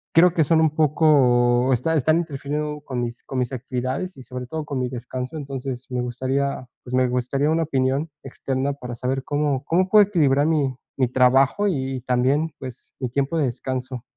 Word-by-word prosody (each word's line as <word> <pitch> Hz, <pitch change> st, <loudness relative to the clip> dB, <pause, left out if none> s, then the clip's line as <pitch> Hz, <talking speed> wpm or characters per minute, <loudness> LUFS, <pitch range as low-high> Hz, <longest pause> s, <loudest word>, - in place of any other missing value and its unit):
creo 175 Hz, +1 st, +6 dB
que 160 Hz, -, +3 dB
son 160 Hz, +2 st, +3 dB
un 160 Hz, -2 st, +3 dB
poco 130 Hz, -5 st, +3 dB
está 130 Hz, +7 st, +1 dB
están 155 Hz, +3 st, +3 dB
interfiriendo 150 Hz, -1 st, -3 dB
con 125 Hz, -4 st, -3 dB
mis 120 Hz, 0 st, -5 dB
con 135 Hz, -, -6 dB
mis 125 Hz, +1 st, -1 dB
actividades 130 Hz, +7 st, -3 dB
y 130 Hz, -, -10 dB
sobre 125 Hz, -1 st, -7 dB
todo 155 Hz, +2 st, -4 dB
con 140 Hz, -3 st, -3 dB
mi 125 Hz, -1 st, -1 dB
descanso, 125 Hz, +3 st, -5 dB
entonces, 135 Hz, -3 st, -5 dB
me 125 Hz, 0 st, -1 dB
gustaría, 130 Hz, +2 st, -2 dB, 0.2 s
pues, 125 Hz, -, -9 dB
me 130 Hz, 0 st, +3 dB
gustaría 125 Hz, +4 st, 0 dB
una 165 Hz, 0 st, +2 dB
opinión 135 Hz, +1 st, 0 dB
externa 135 Hz, +1 st, -2 dB
para 125 Hz, -3 st, -7 dB
saber 130 Hz, +2 st, -2 dB
cómo 145 Hz, -2 st, -1 dB
cómo 185 Hz, +3 st, +2 dB
puedo 210 Hz, +1 st, +6 dB
equilibrar 145 Hz, -6 st, +3 dB
mi 145 Hz, -5 st, +1 dB, 0.2 s
mi 130 Hz, -2 st, +2 dB
trabajo 130 Hz, +10 st, +3 dB
y 160 Hz, -9 st, 0 dB, 0.2 s
y -, -, -7 dB
también, 130 Hz, +6 st, +1 dB
pues, 130 Hz, -2 st, -9 dB
mi 125 Hz, -3 st, -2 dB
tiempo 140 Hz, +6 st, -1 dB
de 150 Hz, -, +2 dB
descanso. 130 Hz, 0 st, -4 dB
135 Hz, 190 wpm, -23 LUFS, 125-150 Hz, 0.2 s, creo